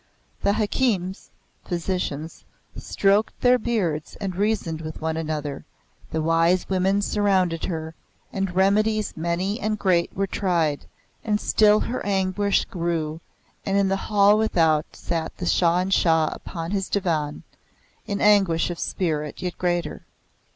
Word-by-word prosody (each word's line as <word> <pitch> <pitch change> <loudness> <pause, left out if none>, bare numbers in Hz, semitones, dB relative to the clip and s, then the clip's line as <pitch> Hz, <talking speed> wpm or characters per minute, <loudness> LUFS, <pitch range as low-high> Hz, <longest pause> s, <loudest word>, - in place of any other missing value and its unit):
The 200 - +2
hakims 205 -4 -1 0.3
(physicians) 170 -3 -3 0.3
stroked 200 +2 +1
their 250 0 +5
beards 185 -10 -2
and 195 -3 -4
reasoned 195 -5 -1
one 160 0 -4
with 160 - -2
another; 150 -3 -4 0.5
the 160 -1 -2
wise 165 +3 +2
women 190 +2 +1
surrounded 190 -6 +1
her, 160 -2 -4 0.4
and 195 -2 -2
remedies 210 +3 +2
many 175 +6 -2
and 215 -2 -1
great 180 -4 +1
were 195 - +1
tried; 170 -6 -1 0.4
and 210 -2 0
still 210 0 +4
her 250 - -3
anguish 195 0 +1
grew, 165 -3 -3 0.4
and 195 0 0
in 200 -1 +2
the 195 - +1
hall 205 0 +5
without 160 -8 +2
sat 165 -2 -4
the 180 - -4
Shah 175 0 +3
in 190 +1 -3
Shah 160 -4 +3
upon 165 -1 -6
his 195 -2 -2
divan, 160 -7 -1 0.6
in 200 -2 -2
anguish 195 -6 +3
of 170 - -7
spirit 150 -4 -2
yet 180 -1 -3
greater. 175 -3 -1
185 Hz, 135 wpm, -24 LUFS, 165-200 Hz, 0.6 s, their